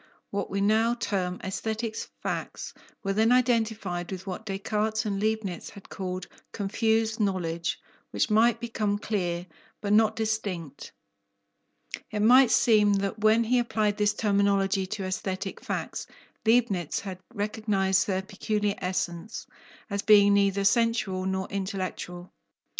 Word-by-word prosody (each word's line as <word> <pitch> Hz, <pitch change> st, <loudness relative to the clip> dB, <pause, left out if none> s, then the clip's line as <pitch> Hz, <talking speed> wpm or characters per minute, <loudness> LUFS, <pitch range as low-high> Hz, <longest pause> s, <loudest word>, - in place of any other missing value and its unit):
What 200 Hz, -1 st, -2 dB
we 195 Hz, 0 st, -1 dB
now 220 Hz, +3 st, +3 dB
term 190 Hz, -6 st, -2 dB
aesthetic 220 Hz, +3 st, -3 dB, 0.3 s
facts -, -, -4 dB, 0.3 s
were 195 Hz, -, 0 dB
then 220 Hz, +3 st, +3 dB
identified 220 Hz, -8 st, +1 dB
with 190 Hz, 0 st, -6 dB
what 195 Hz, +3 st, -6 dB
Descartes 215 Hz, +2 st, -1 dB
and 200 Hz, -2 st, -1 dB
Leibnitz 215 Hz, -5 st, -2 dB
had 200 Hz, -, -14 dB
called 185 Hz, -1 st, -4 dB, 0.3 s
"confused" 220 Hz, +2 st, 0 dB
knowledge, 170 Hz, -5 st, -1 dB, 0.3 s
which -, -, 0 dB
might 230 Hz, +2 st, +4 dB
become 215 Hz, -3 st, -1 dB
"clear," 180 Hz, -5 st, -2 dB, 0.3 s
but 205 Hz, 0 st, 0 dB
not 220 Hz, 0 st, +4 dB
distinct. 200 Hz, -9 st, -3 dB, 1.2 s
It 210 Hz, -, -2 dB
might 250 Hz, +2 st, +7 dB
seem 210 Hz, -3 st, +4 dB
that 200 Hz, +2 st, -1 dB
when 215 Hz, +2 st, +4 dB
he 245 Hz, +2 st, +2 dB
applied 215 Hz, -3 st, 0 dB
this 210 Hz, 0 st, +2 dB
terminology 200 Hz, -2 st, +2 dB
to 205 Hz, 0 st, -4 dB
aesthetic 190 Hz, +1 st, -3 dB
facts, -, -, -4 dB, 0.4 s
Leibnitz 220 Hz, -8 st, +2 dB
had 190 Hz, -2 st, -7 dB, 0.2 s
recognized 205 Hz, -2 st, +1 dB
their 190 Hz, -1 st, 0 dB
peculiar 210 Hz, +1 st, -1 dB
essence, 180 Hz, +2 st, -3 dB, 0.4 s
as 200 Hz, -1 st, -2 dB
being 205 Hz, -1 st, +6 dB
neither 200 Hz, 0 st, +2 dB
sensual 200 Hz, -3 st, +2 dB
nor 190 Hz, 0 st, -1 dB
intellectual. 185 Hz, -2 st, -4 dB
205 Hz, 130 wpm, -27 LUFS, 190-220 Hz, 1.2 s, might